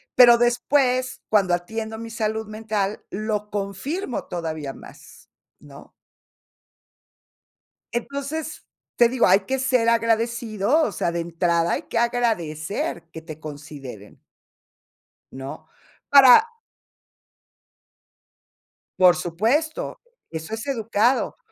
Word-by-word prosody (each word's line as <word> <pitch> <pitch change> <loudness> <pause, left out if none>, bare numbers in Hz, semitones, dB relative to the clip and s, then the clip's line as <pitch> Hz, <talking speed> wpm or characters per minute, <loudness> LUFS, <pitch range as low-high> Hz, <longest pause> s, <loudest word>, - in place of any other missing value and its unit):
pero 240 -1 +8
después, 250 +1 +1
cuando 195 -4 +3
atiendo 220 +5 -3
mi 230 0 -7
salud 220 -1 -2
mental, 215 -2 -3
lo 210 0 -3
confirmo 210 - -4
todavía 160 -5 -5
más, - - -15 0.3
¿no? - - -15 2.0
Entonces, 280 +6 -4 0.3
te 240 - +6
digo, 250 -1 +2
hay 190 +2 +5
que 265 +7 -2
ser 255 -3 +2
agradecido, 230 +2 +1
o 230 - 0
sea, 175 - -1
de 170 0 -2
entrada 170 0 0
hay - - -2
que - - -5
agradecer 205 -9 -1
que 160 - -9
te 160 -2 -10
consideren. 145 -8 -10 1.1
¿No?, 135 +1 -8 0.4
para. 280 - +8 2.5
Por 180 -1 +7
supuesto, 220 - -1 0.3
eso 160 +6 -5
es 225 - -7
educado, 235 -1 0
220 Hz, 100 wpm, -23 LUFS, 175-240 Hz, 2.5 s, pero